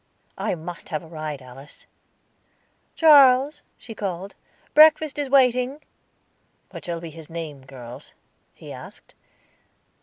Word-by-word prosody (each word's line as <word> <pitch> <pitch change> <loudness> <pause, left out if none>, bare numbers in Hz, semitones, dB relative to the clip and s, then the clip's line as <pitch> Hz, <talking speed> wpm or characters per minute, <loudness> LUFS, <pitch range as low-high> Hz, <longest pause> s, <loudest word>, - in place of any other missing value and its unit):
"I - - -1
must 170 +1 -9
have 155 0 -3
a - - -13
ride, 155 -4 -6
Alice." 130 +3 -14 1.1
"Charles," 285 -2 +6 0.2
she 230 - -10
called. 195 -2 -5 0.4
"Breakfast 310 -1 +5
is 285 -2 -2
waiting." 255 +1 +3 0.9
"What - - -9
shall 170 -1 -4
be 165 -1 -8
his 160 0 -12
name, 160 -5 -7
girls?" 125 0 -11 0.4
he - - -10
asked. - - -13
175 Hz, 120 wpm, -23 LUFS, -, 1.1 s, Charles